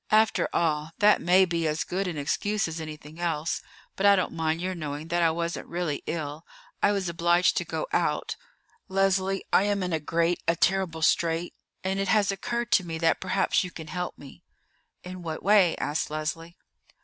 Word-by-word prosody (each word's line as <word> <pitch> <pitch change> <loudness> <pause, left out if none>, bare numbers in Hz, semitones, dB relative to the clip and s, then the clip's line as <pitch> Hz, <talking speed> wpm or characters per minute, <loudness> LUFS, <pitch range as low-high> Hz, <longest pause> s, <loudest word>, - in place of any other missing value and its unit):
"After 215 0 +3
all, 155 -1 0
that 210 0 +5
may 185 +2 +5
be 170 -2 -1
as 155 +1 0
good 190 +2 -2
an 170 -4 -4
excuse 205 +9 0
as 165 0 -5
anything 155 0 -9
else; 165 -2 -1 0.3
but 195 - -3
I 200 0 +7
don't 185 - -1
mind 160 0 -1
your 185 +2 -2
knowing 155 -2 -5
that 175 0 +1
I 165 - +5
wasn't 170 +1 -3
really 170 -4 -2
ill. 155 -1 -4 0.4
I 205 - +4
was 195 -3 -1
obliged 170 +1 +2
to - - 0
go - - -3
out. - - 0 0.5
Leslie, 195 0 +1
I 195 - +5
am 205 -2 0
in 180 -2 -2
a 160 - +1
great, 165 +3 0
a 170 - +3
terrible 175 -2 +1
strait, 165 +1 +1 0.3
and 190 +1 -1
it 195 - 0
has 205 0 +3
occurred 235 +4 -3
to 205 - +4
me 165 -2 -5
that 165 0 +2
perhaps 190 +1 +1
you 180 - -5
can 160 -2 -9
help 180 -1 -4
me." 140 - -13 0.6
"In 180 0 -8
what 160 -2 -5
way?" 195 -4 +5
asked 150 +2 -2
Leslie. 165 +3 -4
175 Hz, 195 wpm, -27 LUFS, 160-190 Hz, 0.6 s, I